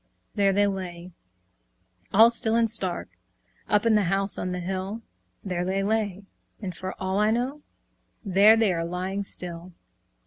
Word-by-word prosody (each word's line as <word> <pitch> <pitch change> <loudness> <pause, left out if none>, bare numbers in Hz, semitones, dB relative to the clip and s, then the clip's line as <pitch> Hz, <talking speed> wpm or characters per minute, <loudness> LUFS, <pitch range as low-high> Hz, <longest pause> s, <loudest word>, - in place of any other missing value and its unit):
There 200 -2 +3
they 205 +1 +3
lay, 185 -3 -5 1.0
all 225 +3 +7
still 225 -1 +1
and 230 0 +3
stark, 195 -5 -3 0.6
Up 210 +1 +2
in 230 - +4
the 210 -2 +3
house 195 +3 +1
on 180 - -3
the 180 - -3
hill; 190 +5 -4 0.4
There 180 -3 -2
they 190 +2 -1
lay, 205 -2 -1 0.4
and, 185 -5 -6
for 185 +1 -6
all 190 +1 -1
I 210 +1 +3
know, 250 +6 -1 0.6
There 200 +3 +6
they 220 -4 +2
are 165 -1 -2
lying 185 +3 -3
still. 180 -2 -5
195 Hz, 160 wpm, -26 LUFS, 185-215 Hz, 1.0 s, all